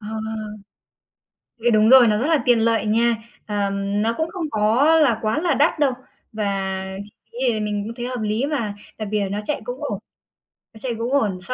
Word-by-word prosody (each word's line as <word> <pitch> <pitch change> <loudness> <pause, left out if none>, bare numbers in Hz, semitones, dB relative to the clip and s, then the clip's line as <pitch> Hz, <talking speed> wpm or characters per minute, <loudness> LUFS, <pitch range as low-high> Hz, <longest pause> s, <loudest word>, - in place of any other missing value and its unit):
Ờ. 210 - -10 1.6
Thì 240 - +5
đúng 215 -1 +4
rồi, 255 -3 +8
nó 210 -1 +2
rất 250 - 0
là 315 -2 +2
tiện 245 -3 +4
lợi 225 -1 +1
nha. 230 +2 +2 0.3
Ờ, 205 -2 -1
nó 205 +3 0
cũng 320 +1 -1
không 335 -4 -4
có 220 +5 +2
là 260 -8 +3
quá 215 +5 0
là 340 -3 +1
đắt 295 +3 +2
đâu, 280 -3 +3 0.4
và 195 -3 -2 0.2
chi 205 - -17 0.2
phí 235 - -10
thì 215 - -2
mình 210 -1 -2
cũng 230 - -6
thấy 245 -1 -4
hợp 250 -1 -4
lý 215 +5 0
mà, 235 -9 -2 0.2
đặc 215 -2 -4
biệt 210 0 0
là 200 - -1
nó 205 +2 -3
chạy 300 - -2
cũng - - -6
ổn, - - -2 0.8
nó 220 - -14
chạy 240 0 -3
cũng 240 +3 -2
ổn 210 -10 +1
so 255 - -2
225 Hz, 220 wpm, -22 LUFS, 210-260 Hz, 1.6 s, rồi